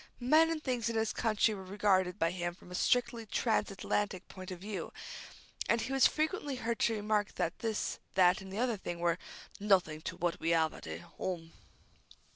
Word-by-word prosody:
Men 310 +6 +5
and 320 -2 -2
things 245 -3 0
in 230 - -3
this 220 0 +1
country 220 -1 +2
were 195 -2 -6
regarded 190 -2 +2
by 165 +1 +2
him 175 -1 -3
from 180 - -16
a - - -6
strictly 240 +3 +1
trans 225 +2 +1
Atlantic 195 0 -2
point 185 -1 -9
of 185 - -5
view, 205 +2 -5 0.8
and 230 - +4
he 265 - -2
was 270 - +7
frequently 310 -3 -1
heard 235 -2 -2
to 225 - +3
remark 210 -1 0
that 165 - -1
this, 225 -2 -2 0.2
that, 185 0 +5
and 190 0 -9
the 195 - -5
other 240 -2 +1
thing 175 -3 -5
were 170 0 +1 0.4
"nothink 180 -7 +2
to - - -4
what 175 0 -1
we 165 +1 +2
'ave 160 -1 +2
at - - -10 0.3
'ome." 165 -3 -3
205 Hz, 195 wpm, -33 LUFS, 180-230 Hz, 0.8 s, was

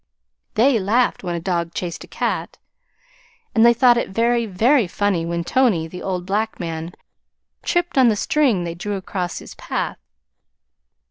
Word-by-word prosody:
They 235 +2 +4
laughed 220 +5 +1
when 175 -2 -2
a - - -2
dog 170 -1 -2
chased 175 -2 -4
a - - -13
cat, - - -3 1.0
and 225 - +4
they 235 - +8
thought 240 0 +5
it - - -3
very, 235 +3 +1
very 225 +4 +3
funny 180 -3 0
when 170 0 -2
Tony, 205 -7 +2
the 180 +2 -9
old 180 -2 -3
black 215 +3 -1
man, 165 0 -5 0.7
tripped 350 -5 0
on 255 - +6
the 220 - +3
string 240 -5 +1
they 170 -1 -4
drew 205 +4 -4
across 185 -2 -4
his - - -9
path. - - -4
200 Hz, 160 wpm, -21 LUFS, 175-235 Hz, 1.0 s, they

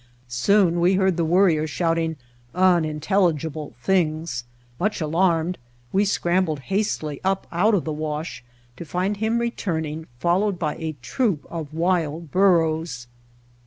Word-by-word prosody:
Soon 175 +8 +3
we 180 +3 +4
heard 190 -1 +2
the 170 - 0
Worrier 165 -2 +3
shouting 165 +1 0 0.4
unintelligible 160 -3 +1
things. 155 -8 0 0.3
Much 210 +3 0
alarmed 170 +2 +1 0.3
we 200 +2 +3
scrambled 175 -5 +1
hastily 155 -8 -1
up 190 0 0
out 205 +6 +3
of 185 - 0
the 155 - -2
wash 150 -2 -4 0.3
to - - -6
find 185 +6 -1
him 220 +2 0
returning, 160 -9 -2
followed 180 +7 +1
by 155 -3 -1
a 160 -2 -4
troop 220 - 0
of 160 -3 -5
wild 165 -2 -1
bur 185 -3 +5
ros. 155 -6 -3
170 Hz, 130 wpm, -23 LUFS, 155-190 Hz, 0.4 s, bur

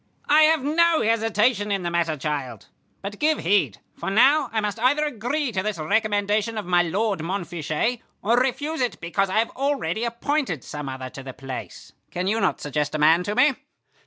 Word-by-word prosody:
"I 300 +2 +5
have 315 -3 +3
no 330 +3 +3
hesitation 220 -1 +1
in 195 -2 -1
the 175 - -2
matter, 170 -2 0
child. 135 -6 -4 0.4
But 200 +1 -6
give 310 0 +2
heed, 200 +3 +2 0.2
for - - -4
now 265 +7 +4
I 225 - 0
must 210 +1 -3
either 285 +6 +2
agree 270 +1 -2
to 190 -3 -1
this 210 -1 -3
recommendation 210 +5 0
of 210 - -3
my 175 0 +3
lord 195 +4 -1
Montfichet, 175 - -2 0.2
or 230 +3 +3
refuse 270 +5 0
it 245 - -1
because 190 +3 -1
I 190 - -1
have 225 +1 +1
already 265 - -1
appointed 235 - -1
some 150 -2 -6
other 130 -1 -6
to 135 - -9
the 130 -1 -8
place. 135 -1 -8 0.2
Can 180 +1 -3
you 220 +4 0
not - - +1
suggest 150 +1 -2
a - - +1
man 160 +3 +5
to 205 - -2
me?" 265 +2 +5
210 Hz, 190 wpm, -24 LUFS, 170-250 Hz, 0.4 s, I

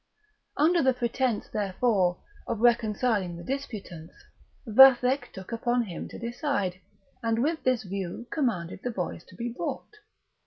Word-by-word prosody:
Under 335 +4 +4
the 260 -2 +3
pretence, 245 -1 -1
therefore, 195 -3 +1 0.3
of 230 - -2
reconciling 220 -5 +2
the 170 - -9
disputants, 200 - -6 0.5
Vathek 260 +3 +6
took 190 +3 -10
upon 240 +1 +1
him 180 -7 -6
to - - -9
decide; 235 - -2 0.4
and 230 -1 0
with 315 +2 0
this 255 -3 +1
view 195 +3 -5
commanded 215 - -1
the 245 - -2
boys 180 -6 -4
to 185 - -16
be 235 +5 -3
brought. - - -5
230 Hz, 140 wpm, -27 LUFS, 190-255 Hz, 0.5 s, Vathek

